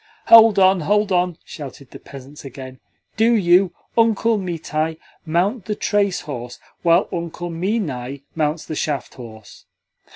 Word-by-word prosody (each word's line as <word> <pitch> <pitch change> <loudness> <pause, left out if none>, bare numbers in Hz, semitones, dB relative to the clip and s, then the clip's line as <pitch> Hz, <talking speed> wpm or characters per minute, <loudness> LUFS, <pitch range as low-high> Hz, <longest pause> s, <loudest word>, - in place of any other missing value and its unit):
"Hold 225 -2 +8
on, 190 -1 +5
hold 205 +5 +1
on!" 180 -2 +1
shouted 140 -3 -10
the - - -11
peasants 140 +1 -12
again. 130 -1 -10 0.4
"Do 230 +2 +4
you, 180 -2 +4 0.2
Uncle 225 -1 +2
Mitai, 160 -3 -3 0.3
mount 185 +7 0
the 210 - -3
trace 200 -2 0
horse, 125 -4 -7 0.2
while 170 +2 +3
Uncle 170 0 -5
Minai 155 - -3
mounts 155 0 -1
the - - -6
shaft 150 -2 -3
horse." 110 -4 -13
170 Hz, 135 wpm, -20 LUFS, 140-200 Hz, 0.4 s, Hold